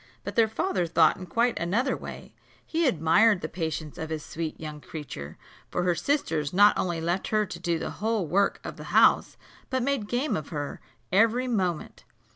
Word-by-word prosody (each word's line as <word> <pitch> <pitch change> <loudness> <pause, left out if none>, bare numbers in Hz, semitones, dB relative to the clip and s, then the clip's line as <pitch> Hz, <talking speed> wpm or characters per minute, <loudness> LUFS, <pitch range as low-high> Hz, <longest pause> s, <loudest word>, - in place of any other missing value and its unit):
But - - -6
their 225 -1 +5
father 220 - -1
thought 160 -1 +4
in 185 0 -8
quite 235 +7 +1
another 225 +11 +1
way: - - -9 0.3
he 330 -1 +1
admired 195 - +4
the 155 - -3
patience 160 -2 -4
of 160 - -4
this 155 -2 -4
sweet 160 -1 -5
young 150 -1 -7
creature; 110 - -8 0.3
for 180 - -1
her 180 -1 +3
sisters 165 - -1
not 205 +3 +6
only 175 -2 -1
left 175 +3 -1
her 215 -1 +2
to 170 -3 -8
do 170 -1 0
the - - -4
whole 220 -3 -1
work 195 +6 +1
of - - -7
the - - -9
house, - - +5 0.3
but 260 -2 0
made 275 -6 -1
game 255 +5 0
of 155 -2 -5
her 145 -3 -5 0.3
every 230 +6 +3
moment. 185 -9 -2
180 Hz, 190 wpm, -27 LUFS, 160-225 Hz, 0.3 s, not